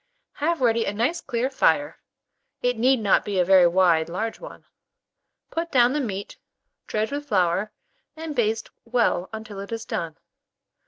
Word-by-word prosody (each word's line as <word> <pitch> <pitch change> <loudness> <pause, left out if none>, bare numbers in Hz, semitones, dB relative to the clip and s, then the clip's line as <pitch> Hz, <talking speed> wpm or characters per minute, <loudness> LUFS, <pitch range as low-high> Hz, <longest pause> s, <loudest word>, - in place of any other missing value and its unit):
Have 325 +1 -1
ready 230 -2 +2
a 200 - -2
nice 245 +11 0
clear 245 0 -1
fire 290 +2 +1 0.6
(it 245 0 +2
need 255 +3 +3
not 205 -3 +3
be 205 -2 -3
a 180 - +3
very 185 -1 +6
wide 170 -2 +3
large 220 +6 -3
one), - - -11 0.9
put 335 +1 -3
down 245 -1 +4
the 300 - 0
meat, 200 -5 -5 0.5
dredge 215 +2 -1
with 290 +1 -4
flour, 190 0 +1 0.4
and 315 -1 -6
baste 225 -2 0
well 230 -6 0
until 220 -2 -8
it 200 +2 -8
is 225 -1 -4
done. 165 -2 -4
225 Hz, 160 wpm, -24 LUFS, 195-260 Hz, 0.9 s, very